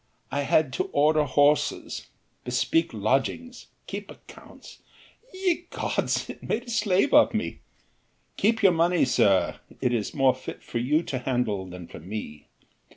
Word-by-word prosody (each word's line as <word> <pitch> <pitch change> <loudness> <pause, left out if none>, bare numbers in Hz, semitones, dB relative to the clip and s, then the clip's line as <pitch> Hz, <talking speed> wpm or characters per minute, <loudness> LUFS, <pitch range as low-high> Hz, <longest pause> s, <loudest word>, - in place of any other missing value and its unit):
I 145 - 0
had 140 -1 +2
to - - -1
order 150 +1 +3
horses, 145 +2 +1 0.4
bespeak 145 +7 +1
lodgings, 135 - -1 0.2
keep - - -7
accounts. - - -14 0.5
Ye 365 -3 -1
gods, - - -1
it - - -9
made 235 - -2
a 245 - -12
slave 210 +2 +2
of - - +6
me! - - -3 0.8
Keep 220 +1 +1
your 190 - +7
money, 170 0 +3
sir, 100 -7 +2 0.2
it 125 -2 0
is 110 -4 -2
more 135 -2 +4
fit 130 - -9
for 120 - -4
you 150 +7 +1
to 130 -5 -3
handle 120 -7 -1
than 90 -1 -9
for - - -11
me. 85 -4 -7
145 Hz, 150 wpm, -26 LUFS, 120-180 Hz, 0.8 s, your